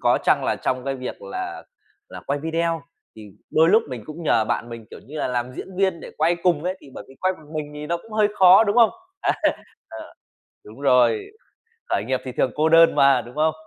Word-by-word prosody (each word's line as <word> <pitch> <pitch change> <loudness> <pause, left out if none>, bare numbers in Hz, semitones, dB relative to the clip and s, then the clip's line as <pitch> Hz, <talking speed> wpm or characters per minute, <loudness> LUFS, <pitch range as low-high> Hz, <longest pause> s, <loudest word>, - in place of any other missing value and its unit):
có - - +3
chăng - - +2
là - - 0
trong 130 -1 -2
cái 135 0 -2
việc 130 -1 -7
là 370 0 -6 0.5
là - - -9
quay 140 +1 -1
video 165 0 -2 0.3
thì 110 - -11 0.3
đôi 160 +1 +4
lúc 215 +5 +5
mình 125 -4 -6
cũng 155 +2 -8
nhờ 115 -8 +2
bạn 115 - -2
mình, 115 -2 -9
kiểu - - -11
như 150 +3 -8
là, - - -1
làm 125 0 -2
diễn - - -7
viên 190 -3 0
để - - -9
quay 165 +3 +2
cùng 170 -4 +1
ấy, 185 +1 -2
thì 140 - -15
bởi - - -8
vì 135 - -15
quay 185 0 +1
một 155 -5 -16
mình 150 -1 -4
thì 150 0 -7
nó 170 +2 -1
cũng 220 +5 -15
hơi 215 -1 +3
khó, 190 +3 +7
đúng 205 +1 0
không? 235 -2 +6 0.3
Á, - - +1 0.6
ờ, - - -10 0.5
đúng 110 +6 -14
rồi, 125 -5 +3 0.6
khởi 100 - 0
nghiệp 130 0 -1
thì 130 - -6
thường 125 - 0
cô 155 +2 +2
đơn 165 0 +6
mà, 135 -2 +4
đúng 120 +4 -13
không? 155 +1 +2
155 Hz, 235 wpm, -22 LUFS, 130-175 Hz, 0.6 s, khó